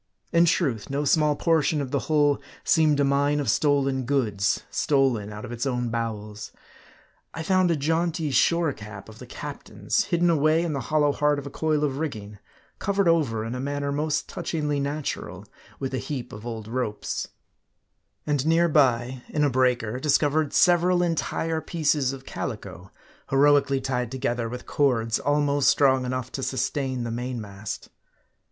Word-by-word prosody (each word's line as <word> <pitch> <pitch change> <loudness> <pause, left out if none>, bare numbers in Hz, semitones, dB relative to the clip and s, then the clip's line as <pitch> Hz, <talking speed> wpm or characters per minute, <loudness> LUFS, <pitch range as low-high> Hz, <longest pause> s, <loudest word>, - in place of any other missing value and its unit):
In 170 0 +5
truth, 140 - 0
no 140 +2 -1
small 150 +1 +3
portion 160 -1 +2
of 135 -3 -4
the 140 - +1
hull 145 -2 +3 0.2
seemed 155 -3 +3
a - - +4
mine 140 +1 +2
of 145 - +1
stolen 140 -3 +1
goods, 110 -7 0
stolen 130 -8 +1
out 105 0 -7
of - - -8
its 120 +3 -3
own 125 -2 -1
bowels. 105 -3 -4 0.8
I 160 - -4
found 185 +1 +3
a 170 - +2
jaunty 160 +1 0
shore 165 +4 +2
cap 105 -2 -10
of 110 - -13
the - - -10
captain's, - - -3
hidden 170 0 +2
away 155 +1 +3
in 165 -3 -2
the 140 - -2
hollow 150 -2 +3
heart 150 0 +1
of 140 - -6
a 140 - -7
coil 155 0 0
of 140 -2 -1
rigging; 105 -10 -5 0.4
covered 200 -1 +1
over 135 -10 +2
in 115 - -4
a 125 - -4
manner 140 +1 -2
most 150 +1 -1
touchingly 150 -4 -2
natural, 145 +1 -4 0.3
with 135 -1 -4
a 130 - -1
heap 130 0 -5
of 105 +3 -8
old 110 -2 -6
ropes; 115 -3 -3 1.0
and 145 -3 0
near 165 +2 +3
by, 130 -4 +2
in 150 - 0
a 145 - +2
breaker, 125 -2 +1
discovered 150 +1 +2
several 180 0 +4
entire 165 -1 -1
pieces 150 -6 0
of 135 -1 -9
calico, 95 -5 -6 0.4
heroically 140 0 +4
tied 125 -3 -2
together 120 -3 -2
with 125 +1 -7
cords 115 -5 +1
almost 145 -1 +2
strong 130 -2 +3
enough 130 0 -3
to 135 - -5
sustain 130 0 -2
the 115 - -4
mainmast. 110 -4 -5
140 Hz, 165 wpm, -25 LUFS, 125-150 Hz, 1.0 s, In